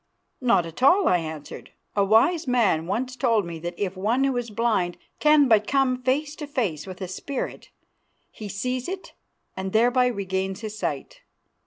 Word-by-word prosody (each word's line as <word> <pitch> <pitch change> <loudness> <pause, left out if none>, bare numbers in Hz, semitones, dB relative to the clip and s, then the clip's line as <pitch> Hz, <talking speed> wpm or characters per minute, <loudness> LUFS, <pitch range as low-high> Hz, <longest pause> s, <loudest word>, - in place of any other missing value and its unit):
"Not 235 -9 +3
at 165 +7 -9
all," 355 +8 +5
I 180 - +4
answered. 155 -2 -8 0.2
"A 200 - +3
wise 265 - +3
man 205 -10 +2
once 250 +6 -2
told 230 -5 +2
me 170 -1 -6
that 175 +2 -5
if 195 -2 -2
one 220 +8 +1
who 270 -1 +1
is 245 -1 -2
blind 210 -5 0 0.2
can 300 -2 +5
but 215 -3 +4
come 265 -2 +1
face 285 +4 0
to 295 - -6
face 205 - -2
with 185 0 -9
a 185 - -3
spirit, 255 +9 -5 0.6
he 210 -2 -8
sees 250 +6 -3
it 375 0 -7 0.4
and 190 0 -4
thereby 245 +3 +4
regains 190 -3 -2
his 215 -1 -6
sight. - - -4
230 Hz, 175 wpm, -25 LUFS, 190-260 Hz, 0.6 s, all